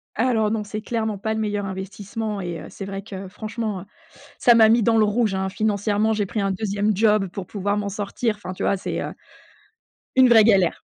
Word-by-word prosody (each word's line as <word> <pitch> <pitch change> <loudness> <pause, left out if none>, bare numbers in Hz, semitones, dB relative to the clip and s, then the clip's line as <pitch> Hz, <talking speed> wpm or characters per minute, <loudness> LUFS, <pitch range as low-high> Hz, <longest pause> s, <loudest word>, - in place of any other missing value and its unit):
Alors 220 -2 +2
non, 220 -2 -1
c'est 210 +1 -6
clairement 220 -3 -2
pas 220 +3 -2
le 220 - -2
meilleur 205 -2 -1
investissement 200 +2 -5
et 175 -2 -4
heu, - - -9
c'est 195 - -7
vrai 195 0 -6
que 195 -2 -7
franchement, 215 -1 -4
heu, - - -9 0.6
ça 240 - +6
m'a 220 -1 +7
mis 230 0 +4
dans 225 +1 +3
le 215 - +5
rouge, 210 -1 +1
hein, 190 0 -1
financièrement, 210 +1 0
j'ai 210 -2 0
pris 215 - -3
un 195 - 0
2e 205 +1 0
job 210 -1 +3
pour 180 0 -7
pouvoir 200 +1 -2
m'en 205 -1 -2
sortir. 210 +2 -2
Enfin, 185 -3 -7
tu - - -6
vois, 195 - +2
c'est, - - -4
heu, - - -4 1.0
une 260 -1 +6
vraie 225 -2 +7
galère. 195 -6 +3
210 Hz, 220 wpm, -23 LUFS, 195-220 Hz, 1.0 s, m'a